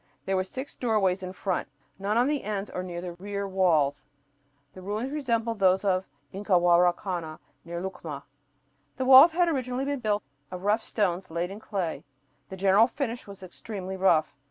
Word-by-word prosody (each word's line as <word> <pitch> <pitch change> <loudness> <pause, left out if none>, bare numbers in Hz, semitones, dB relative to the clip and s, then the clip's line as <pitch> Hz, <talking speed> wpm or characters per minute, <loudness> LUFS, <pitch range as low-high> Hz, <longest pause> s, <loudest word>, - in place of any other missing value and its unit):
There 195 - 0
were 185 - +1
six 260 +9 -7
doorways 200 -6 +1
in 185 0 -5
front, 185 -1 -2 0.3
none 205 +3 0
on 240 - +4
the 290 0 -1
ends 205 -1 -4
or 180 - -3
in 185 - -7
the 175 0 -5
rear 200 +1 -4
walls. 155 -7 +2 0.7
The 185 - -11
ruins 210 +7 -3
resembled 230 -6 -1
those 190 +1 +3
of 190 -1 +1 0.3
Incahuaracana, 175 -3 +2 0.3
near 170 0 -5
Lucma. 165 -6 -6 0.7
The 260 - -1
walls 270 +5 +9
had 350 +1 +3
originally 260 -4 -1
been 285 -1 -2
built 210 -3 0 0.3
of 180 0 -7
rough 210 +3 +2
stones 190 -5 -1
laid 170 +3 -3
in 200 - -8
clay. 175 -9 -3 0.5
The 190 - -7
general 195 +4 +5
finish 245 -3 -4
was 200 -1 -11
extremely 190 +1 -7
rough. 170 -5 +2
195 Hz, 170 wpm, -27 LUFS, 180-225 Hz, 0.7 s, walls